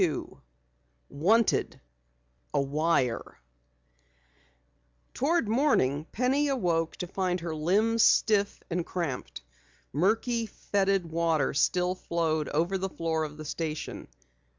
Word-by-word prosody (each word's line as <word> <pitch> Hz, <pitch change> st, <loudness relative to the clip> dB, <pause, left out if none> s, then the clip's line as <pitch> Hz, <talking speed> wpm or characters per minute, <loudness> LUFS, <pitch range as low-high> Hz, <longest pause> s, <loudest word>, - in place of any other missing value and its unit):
CHAPTER 170 Hz, -5 st, +3 dB
22 -, -, -8 dB, 0.7 s
WANTED 215 Hz, +10 st, +2 dB, 0.7 s
A -, -, +4 dB
WIRE 140 Hz, -3 st, 0 dB, 1.7 s
Toward 305 Hz, -2 st, +1 dB
morning 190 Hz, -, +2 dB
Penny 265 Hz, +5 st, +1 dB
awoke 175 Hz, -, 0 dB
to -, -, -4 dB
find 180 Hz, -1 st, -2 dB
her 170 Hz, -1 st, -4 dB
limbs 205 Hz, +9 st, +2 dB
stiff 205 Hz, -2 st, +3 dB
and 175 Hz, +1 st, 0 dB
cramped. 165 Hz, -, -4 dB, 0.5 s
Murky, 225 Hz, -, +1 dB
fetid 195 Hz, -4 st, 0 dB
water 165 Hz, -4 st, +1 dB
still 180 Hz, +5 st, +2 dB
flowed 165 Hz, -4 st, -1 dB
over 170 Hz, +6 st, 0 dB
the 190 Hz, +1 st, -2 dB
floor 165 Hz, -2 st, -1 dB
of 150 Hz, -1 st, -6 dB
the 155 Hz, -, -8 dB
station. 155 Hz, +1 st, -4 dB
175 Hz, 110 wpm, -28 LUFS, 155-210 Hz, 1.7 s, A